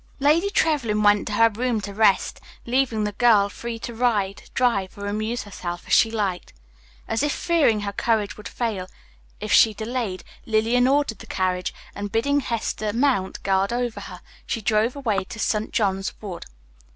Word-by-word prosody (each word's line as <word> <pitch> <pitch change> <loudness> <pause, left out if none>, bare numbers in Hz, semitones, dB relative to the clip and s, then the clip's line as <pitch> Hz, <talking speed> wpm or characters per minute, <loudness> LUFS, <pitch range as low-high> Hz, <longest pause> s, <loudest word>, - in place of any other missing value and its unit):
Lady 310 +8 +3
Trevlyn 275 - +1
went 205 +2 +4
to 210 - -3
her 230 +2 +5
room 235 +1 -1
to 200 0 -6
rest, 200 -2 +2 0.2
leaving 240 -3 +1
the 210 - -1
girl 205 -2 +4
free 235 +2 -6
to 235 +1 -7
ride, 215 -5 -1
drive, 215 -8 +1
or 200 - -6
amuse 215 +2 -2
herself 175 -4 -6
as - - -2
she 225 - +6
liked. 200 -5 -3 0.5
As 225 +2 -1
if 295 0 +1
fearing 290 -13 +2
her 200 -1 -3
courage 215 -1 0
would 210 - -9
fail 215 -6 -3 0.5
if - - -5
she 220 -1 +6
delayed, 220 -3 -3 0.2
Lillian 230 +3 +3
ordered 275 -6 +1
the - - -11
carriage, 185 -1 -1 0.2
and, 205 0 -5
bidding 280 +7 +2
Hester 225 -4 -2
mount 240 -6 0
guard 195 +1 +1
over 240 -1 -2
her, - - -9 0.3
she 230 - -1
drove 220 +3 +1
away 225 -9 -1
to 220 - -9
St. 215 0 -1
John's 195 -3 -1
Wood. 190 -5 -7
220 Hz, 175 wpm, -23 LUFS, 200-245 Hz, 0.5 s, she